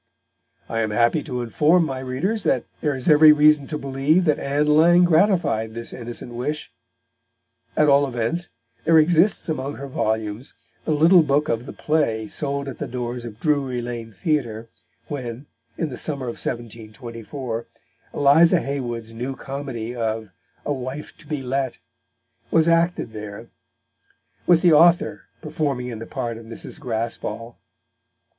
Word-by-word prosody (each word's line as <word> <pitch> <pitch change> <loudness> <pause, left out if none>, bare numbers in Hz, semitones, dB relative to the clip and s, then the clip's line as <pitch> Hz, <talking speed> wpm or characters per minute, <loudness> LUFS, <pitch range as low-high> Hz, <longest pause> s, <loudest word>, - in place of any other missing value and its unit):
I 115 - -2
am 110 - 0
happy 120 +8 +2
to 125 -5 -4
inform 155 +8 +3
my 135 -3 -4
readers 135 - -2
that - - +1 0.2
there 150 -3 0
is 130 - -2
every 155 0 +8
reason 150 -1 +5
to 150 - -3
believe 140 +6 +1
that 150 -3 +2
Ann 145 +2 0
Lang 165 +4 +5
gratified 170 - +2
this 115 0 -4
innocent 120 0 -6
wish. 150 +6 -4 1.1
At 150 - +4
all 140 0 +5
events, 125 +8 -2 0.3
there 165 0 +5
exists 170 +5 +4
among 145 -3 -3
her 140 - -7
volumes 110 -2 -2 0.3
the - - 0
little 165 +4 +6
book 150 0 +1
of 115 +3 -2
the - - -6
play 115 -9 0
sold 140 +3 -2
at 135 - -7
the - - -3
doors 120 -1 -4
of 115 -2 -9
Drury 140 -4 0
Lane 120 -2 -6
Theatre, 115 - -2 0.4
when, 130 -2 -6 0.3
in 160 - -1
the 125 - -6
summer 140 -4 -2
of 120 - -5
1724, 115 +1 -6 0.5
Eliza 160 +5 +5
Haywood's 120 -6 -4
new 125 +4 -4
comedy 130 -4 -5
of 110 -2 -2 0.4
A 145 - 0
Wife 130 +2 -6
to 155 - -16
be 150 -3 -3
Lett 130 0 -2 0.7
was 165 0 +3
acted 170 -5 +2
there, 105 +1 -8 1.0
with 170 -2 +5
the 175 -3 +6
author 170 +3 +4 0.2
performing 145 -5 -2
in 115 -3 -6
the 115 - -8
part 115 -1 -4
of 115 - -13
Mrs. 115 +7 -5
Graspall. 115 -2 -4
135 Hz, 150 wpm, -22 LUFS, 115-155 Hz, 1.1 s, every